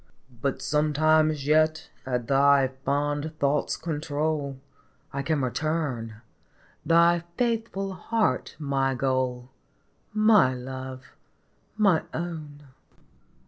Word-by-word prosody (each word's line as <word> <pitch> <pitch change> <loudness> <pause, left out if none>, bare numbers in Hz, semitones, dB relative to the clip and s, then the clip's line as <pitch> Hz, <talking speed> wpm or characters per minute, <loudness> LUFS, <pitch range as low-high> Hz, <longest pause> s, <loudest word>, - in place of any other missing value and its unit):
But 140 -2 -2
sometimes 155 0 +2
yet 155 +1 +2 0.2
at 125 -2 -2
thy 140 0 +4
fond 145 +2 -1
thought's 140 0 0
control 150 -3 -2 0.6
I 140 - -2
can 150 -1 0
return, 125 -6 -2 0.6
thy 170 +1 +4 0.2
faithful 225 -5 -1
heart 225 +3 -1
my 135 -3 0
goal, 130 -1 -1 0.6
My 210 -11 +5
Love, 130 +1 -7 0.7
my 200 -7 +4
Own 155 -4 -6
145 Hz, 90 wpm, -26 LUFS, 135-160 Hz, 0.7 s, My